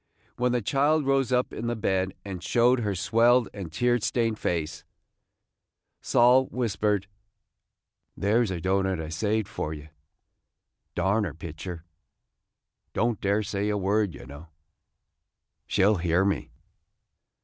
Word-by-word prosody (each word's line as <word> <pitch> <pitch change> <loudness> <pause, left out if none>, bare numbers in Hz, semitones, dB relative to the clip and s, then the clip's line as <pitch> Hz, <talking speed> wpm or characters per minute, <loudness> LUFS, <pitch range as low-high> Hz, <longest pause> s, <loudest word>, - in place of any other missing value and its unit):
When 125 +1 +1
the 120 -2 0
child 145 +6 +2
rose 135 -1 +1
up 125 0 +1
in 120 - -4
the 120 - -1
bed 95 -3 -1
and 95 -3 -6
showed 120 +6 +3
her 105 -4 -1
swelled 115 +5 +3
and 95 -6 -7
tear 120 +8 +2
stained 115 0 0
face, 80 -2 -2 1.2
Sol 125 +2 +4
whispered: 105 -4 -1 1.1
'There 110 +5 +2
's 110 - -2
a 90 -2 -3
doughnut 95 +1 0
I 80 -1 -5
saved 105 +6 -1
for 80 +1 -4
ye. 75 +1 -11 1.1
Darn 95 +5 +1
her 100 - -4
pictur'! 85 +1 -7 1.1
Don't 115 -2 0
dare 100 +2 +1
say 100 +1 -2
a 105 - 0
word, 100 -1 0
ye - - -11
know. 70 +4 -11 1.2
She 95 - +2
'll 105 0 +4
hear 85 +2 +2
me." 100 - -1
105 Hz, 140 wpm, -26 LUFS, 95-120 Hz, 1.2 s, Sol